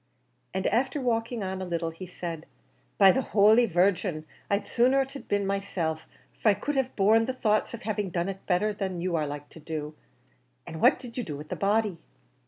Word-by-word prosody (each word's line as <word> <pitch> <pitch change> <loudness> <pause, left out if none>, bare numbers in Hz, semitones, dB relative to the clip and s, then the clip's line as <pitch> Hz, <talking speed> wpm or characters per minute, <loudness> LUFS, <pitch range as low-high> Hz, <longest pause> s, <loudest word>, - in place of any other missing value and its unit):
And 190 0 -3
after 265 +4 +1
walking 235 -3 -1
on 190 0 -3
a - - -3
little, 170 -2 -2
he 180 +3 -9
said, 170 -3 -6 0.5
"By 195 -2 +8
the 265 - +1
holy 220 +2 +5
Virgin, 180 -3 +1 0.2
I'd 200 0 +1
sooner 255 +3 +3
it 270 - -11
had 275 - -9
been 205 -1 0
myself; 185 -5 -2 0.3
for 220 - +4
I 205 - +4
could 285 +9 -3
have 265 -1 0
borne 220 +3 +4
the 260 - -2
thoughts 215 -1 +1
of 235 - -12
having 210 -3 -2
done 175 0 -1
it 195 -1 -6
better 205 +3 +2
than 190 -3 -3
you 180 -1 -1
are 155 -2 0
like 145 0 -7
to - - -13
do. 155 -1 -5 0.7
An' 160 - -7
what - - +5
did 250 -1 -8
you - - -1
do 150 -8 -5
with 150 +1 -10
the - - -3
body?" 205 -3 +1
195 Hz, 210 wpm, -27 LUFS, 170-225 Hz, 0.7 s, By